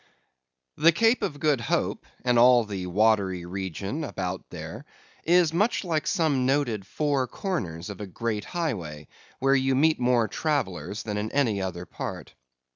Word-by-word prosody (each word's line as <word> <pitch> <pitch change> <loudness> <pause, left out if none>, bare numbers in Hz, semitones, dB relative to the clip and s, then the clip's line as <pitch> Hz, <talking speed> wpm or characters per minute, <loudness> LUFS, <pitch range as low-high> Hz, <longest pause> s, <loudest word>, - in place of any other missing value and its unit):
_) - - -8
The 165 - +8
Cape 225 +7 +3
of 155 -8 -3
Good 145 -5 +2
Hope, 115 - -1 0.2
and 120 -1 +4
all 120 0 +7
the 95 -3 -5
watery 95 -2 +2
region 95 - -4
round - - -2
about 95 -7 -5
there, - - -8 0.4
is 170 -1 +4
much 210 +8 +1
like 160 -4 -1
some 155 -8 +1
noted 120 -8 0
four 140 -2 0
corners 95 - -4
of 100 - -9
a 105 - -5
great 105 +2 -3
highway, 90 - -4 0.3
where 135 +1 +2
you 135 -1 +2
meet 155 +4 +3
more 120 -2 +3
travellers 105 - -2
than 105 -2 -3
in 105 +1 -3
any 115 -8 +1
other 90 -2 -4
part. - - -7
120 Hz, 165 wpm, -26 LUFS, 95-150 Hz, 0.4 s, The